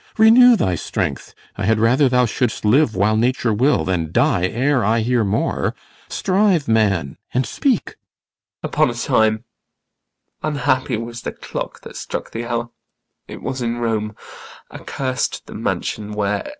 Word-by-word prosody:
Renew 235 +3 +7
thy 95 - 0
strength; 85 - -3 0.2
I 100 - -2
had 110 +2 +3
rather 130 +5 +4
thou 125 0 +3
shouldst 115 -1 -2
live 120 +2 +3
while 105 +3 +2
nature 120 0 +1
will 130 +8 +2
Than 85 -4 -1
die 115 - +2
ere 130 +4 +1
I 110 +3 +2
hear 120 0 +1
more. 105 +2 -1 0.3
Strive, 190 -5 +1
man, 100 -10 +1 0.2
and 130 0 +2
speak. 260 -7 0
IACHIMO. - - -28
Upon - - +2
a - - -3
time 110 0 +1 1.0
unhappy 130 -4 0
was 115 +1 -6
the - - -4
clock - - -6
That - - -11
struck - - -5
the 115 +1 -4
hour! 120 0 -3 0.6
was 130 -1 -5
in 120 0 -1
Rome 110 -3 -2 0.6
accurs'd 130 -2 -3
The - - -11
mansion 105 -1 -3
where! 105 - -1
120 Hz, 150 wpm, -20 LUFS, 110-130 Hz, 1.0 s, Renew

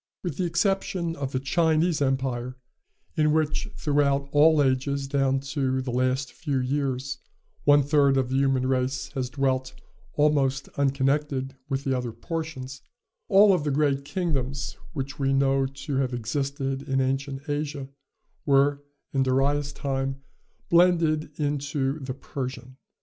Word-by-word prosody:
With 175 -6 -4
the 185 - 0
exception 175 -1 0
of 140 -3 -4
the 130 - -1
Chinese 160 +3 +2
empire, 130 -2 -1 0.6
in 150 -1 +3
which, 155 +6 0
throughout 140 -2 +1
all 150 0 +5
ages 135 +1 0
down 135 -1 +1
to 130 -3 0
the 130 -1 -3
last 130 +1 0
few 145 -6 -2
years, 135 0 -2 0.5
one 145 0 +6
third 140 -1 +3
of 130 -2 +1
the 130 - -1
human 135 -2 +2
race 130 0 -1
has 130 -3 -2
dwelt 130 -1 -1 0.3
almost 140 -2 +2
unconnected 135 0 0
with 135 0 -1
the 135 -2 0
other 125 -2 -3
portions, 135 +1 -5 0.5
all 200 0 +6
the 150 -4 -1
great 140 -1 +1
kingdoms, 140 -5 -2 0.2
which 140 -1 -5
we 135 0 +1
know 135 0 +2
to 135 +1 -5
have 130 -2 0
existed 135 +3 -2
in 135 -2 -1
ancient 135 +1 -2
Asia, 145 -2 -3 0.6
were, 140 0 +3 0.3
in 135 - +2
Darius' 140 +2 +1
time, 135 -1 -3 0.4
blended 165 -3 +3
into 145 -1 -1
the 130 -2 -5
Persian. 130 -2 -6
140 Hz, 140 wpm, -26 LUFS, 130-145 Hz, 0.6 s, one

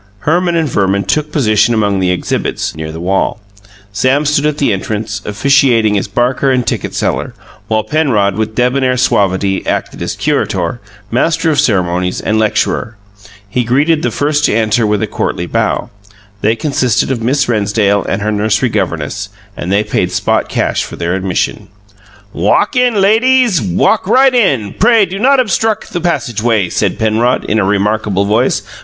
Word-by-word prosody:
Herman 175 +2 +1
and 165 -2 +1
Verman 100 -4 0
took 150 +10 -1
position 110 -4 +2
among 100 -3 +1
the 90 -1 +1
exhibits, 90 -2 -2
near 80 0 -6
the 80 - -8
wall; 95 +6 -1 0.5
Sam 130 +8 +1
stood 150 0 +1
at 150 -1 -2
the 140 -7 +1
entrance, 105 +1 -4
officiating 115 -1 +2
as 100 - -1
barker 125 +6 0
and 125 -2 +1
ticket - - -3
seller; - - -2 0.3
while 110 0 0
Penrod, 110 -7 +1
with 110 0 -3
debonair 125 +1 +1
suavity, 100 -5 +1
acted - - -3
as - - -3
curator, 90 +5 -1 0.3
master 165 +6 +1
of 145 - +1
ceremonies, 90 -8 0
and 110 0 0
lecturer. 110 0 -1 0.5
He 125 +5 -1
greeted 145 +7 +1
the - - 0
first 150 +1 -1
to - - +1
enter 110 0 +1
with 105 -1 0
a - - +2
courtly - - -3
bow. - - -1 0.5
They 110 +2 +2
consisted 130 -3 0
of 125 -3 -2
Miss 135 +4 +1
Rennsdale 100 -2 +1
and 100 +1 -2
her 110 - 0
nursery 110 +4 +1
governess, 95 -1 -3 0.3
and 90 - -5
they 100 +2 +2
paid - - -1
spot - - 0
cash - - -1
for - - -8
their 85 +1 -2
admission. 95 -1 -2 0.7
"Walk 210 - +1
in, 250 -4 +2
lay 205 +3 +4
deeze, 250 - +3
walk 110 - +1
right 260 +4 +4
in 135 - +1
pray 225 -1 +4
do 190 +1 -6
not 270 +4 +4
obstruck 220 -1 0
the 175 - -5
passageway," 120 - 0
said - - -1
Penrod, 110 +3 +1
in 110 - 0
a - - +2
remarkable 100 0 0
voice. 110 +5 +1
115 Hz, 170 wpm, -13 LUFS, 100-150 Hz, 0.7 s, lay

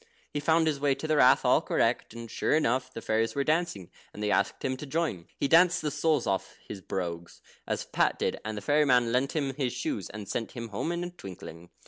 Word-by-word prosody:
He 150 - -1
found 160 +2 +3
his 150 -3 0
way 140 -1 +2
to 155 - -5
the 155 -1 +2
Rath 130 -1 +5
all - - +5
correct, - - 0
and 115 0 -7
sure - - +1
enough 130 -3 +1
the 115 - -8
fairies 110 +3 0
were 140 - +1
dancing, 155 - -1 0.2
and 105 - -7
they 105 - +1
asked 100 - 0
him 130 - 0
to 150 - -8
join. 150 - -2
He - - 0
danced 170 +2 +5
the 150 - -1
soles 155 -3 +1
off 95 -1 -2
his 100 - -7
brogues, 85 -3 -5 0.3
as - - -2
Pat - - +1
did, - - -2
and 110 0 -4
the - - -4
fairy 150 +6 +3
man 125 -3 +3
lent 130 +3 +1
him 140 -3 0
his 130 -2 -2
shoes, 305 -4 -3
and 105 -2 -8
sent 115 +3 -3
him 115 -1 -6
home 105 +11 -2
in 175 0 -2
a 175 - -5
twinkling. 85 - -10
130 Hz, 235 wpm, -28 LUFS, 105-155 Hz, 0.3 s, Rath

